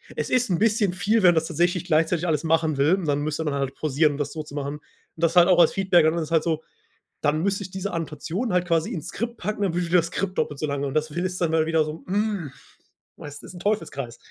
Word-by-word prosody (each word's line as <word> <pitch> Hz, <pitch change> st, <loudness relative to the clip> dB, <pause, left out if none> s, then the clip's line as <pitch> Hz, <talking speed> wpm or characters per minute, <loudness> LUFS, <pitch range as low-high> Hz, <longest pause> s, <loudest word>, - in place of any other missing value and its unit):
„Es -, -, -3 dB
ist 250 Hz, -1 st, +2 dB
'n 175 Hz, -, +1 dB
bisschen 215 Hz, -2 st, +2 dB
viel, 200 Hz, +5 st, +1 dB
wenn 180 Hz, -, +8 dB
man 175 Hz, -, +3 dB
das 160 Hz, 0 st, +1 dB
tatsächlich 175 Hz, +1 st, 0 dB
gleichzeitig 165 Hz, +1 st, +1 dB
alles 155 Hz, -2 st, 0 dB
machen 160 Hz, -1 st, +1 dB
will. 150 Hz, +7 st, +3 dB
Man 150 Hz, -6 st, -1 dB
müsste 155 Hz, +2 st, -2 dB
dann 150 Hz, -, -1 dB
halt 135 Hz, -1 st, -2 dB
pausieren, 150 Hz, 0 st, +1 dB
um -, -, -6 dB
das 145 Hz, -1 st, -3 dB
so 155 Hz, -, -5 dB
zu 150 Hz, -, -13 dB
machen.“ 145 Hz, +1 st, -4 dB, 0.4 s
Das 165 Hz, +1 st, 0 dB
halt 175 Hz, -1 st, +7 dB
auch 180 Hz, -2 st, +4 dB
als 170 Hz, -, +6 dB
Feedback, 185 Hz, -4 st, +3 dB
und 155 Hz, -, +4 dB
dann 170 Hz, -, -1 dB
ist 155 Hz, -, -4 dB
es -, -, -17 dB
halt 165 Hz, -2 st, +3 dB
so, 160 Hz, -2 st, -1 dB, 0.6 s
dann 155 Hz, +1 st, +1 dB
müsste 200 Hz, +1 st, 0 dB
ich 190 Hz, -, -9 dB
diese 190 Hz, +1 st, -4 dB
Annotation 165 Hz, -, -3 dB
halt 180 Hz, -1 st, +1 dB
quasi 165 Hz, -2 st, +1 dB
ins 170 Hz, +1 st, -5 dB
Skript 235 Hz, +5 st, -4 dB
packen, 210 Hz, +2 st, -4 dB
dann 190 Hz, -4 st, 0 dB
würde 175 Hz, 0 st, -1 dB
das 170 Hz, -1 st, +3 dB
Skript 185 Hz, +2 st, -3 dB
doppelt 145 Hz, -, -1 dB
so 155 Hz, -, -1 dB
lange. 140 Hz, -1 st, -2 dB
Und 135 Hz, -, -5 dB
das 155 Hz, 0 st, +1 dB
findest 180 Hz, +4 st, -3 dB
dann 165 Hz, -2 st, +1 dB
mal 160 Hz, -1 st, +2 dB
wiederum, 160 Hz, -1 st, -1 dB
hm 200 Hz, -6 st, -1 dB, 0.7 s
weißt, 145 Hz, 0 st, -10 dB
ist -, -, -10 dB
'n -, -, -9 dB
Teufelskreis. 140 Hz, -, -2 dB
165 Hz, 260 wpm, -24 LUFS, 155-185 Hz, 0.7 s, wenn